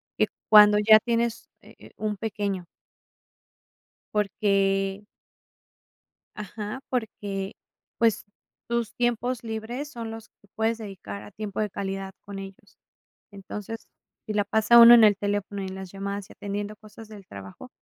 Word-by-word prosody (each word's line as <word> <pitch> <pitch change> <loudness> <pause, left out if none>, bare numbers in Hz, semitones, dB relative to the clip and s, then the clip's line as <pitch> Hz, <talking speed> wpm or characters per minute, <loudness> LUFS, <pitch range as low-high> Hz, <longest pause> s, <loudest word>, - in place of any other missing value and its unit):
y - - +2 0.2
cuando 210 -1 +8
ya 215 +1 +7
tienes, 235 0 -1
eh - - -16
eh, - - -14
un 210 -1 -2
pequeño 200 -3 -3 1.5
porque 195 -1 +1 1.3
ajá, 210 +3 -6
porque, 205 -5 -3 0.4
pues, 225 -3 +2 0.4
tus 235 -2 -1
tiempos 240 0 -1
libres 230 +5 -5
son 230 -4 -6
los 225 0 -9
que 205 - -28
puedes 225 +1 0
dedicar 180 - -8
a 105 - -12
tiempo 210 -2 -6
de 210 - -1
calidad 195 0 -4
con 200 -1 -7
ellos. 195 0 -12 0.5
Entonces, 205 +3 -8 0.4
si 215 - -4
la 210 -1 +2
pasa 220 +3 +4
uno 235 0 +11
en 235 -2 +8
el 210 -1 +6
teléfono 205 0 -2
y - - -4
en 190 - -7
las 190 -1 -8
llamadas, 200 0 -5
y - - -12
atendiendo 205 +1 -5
cosas 215 +1 -13
del 205 -3 -12
trabajo, 95 -1 -10
210 Hz, 145 wpm, -26 LUFS, 195-225 Hz, 1.5 s, uno